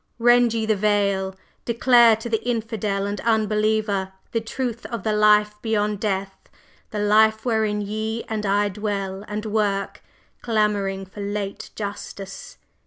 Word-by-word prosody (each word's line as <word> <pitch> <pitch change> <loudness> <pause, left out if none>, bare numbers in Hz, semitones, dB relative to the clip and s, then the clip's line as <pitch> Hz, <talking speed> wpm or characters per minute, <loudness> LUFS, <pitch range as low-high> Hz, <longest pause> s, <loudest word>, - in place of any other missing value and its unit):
"Rend 240 0 +4
ye 225 -1 0
the 215 -1 +2
veil! 200 -2 +1 0.3
Declare 235 -1 +5
to 225 +2 -7
the 225 -2 0
infidel 220 -4 -2
and 205 0 -3
unbeliever 215 -3 +1 0.2
the 230 - 0
truth 235 +1 -4
of 235 -5 -5
the 215 - 0
life 210 0 +4
beyond 210 -2 0
death; 195 -2 -3 0.4
the 215 - -5
life 220 +2 +3
wherein 220 -3 +1
ye 215 +2 -3
and 220 -2 -4
I 205 +1 +2
dwell 200 -1 -3
and 210 +1 -4
work, 205 -2 -1 0.4
clamoring 205 -4 0
for 190 +2 -10
late 200 0 -4
justice!" 200 -2 -7
210 Hz, 140 wpm, -23 LUFS, 200-220 Hz, 0.4 s, Declare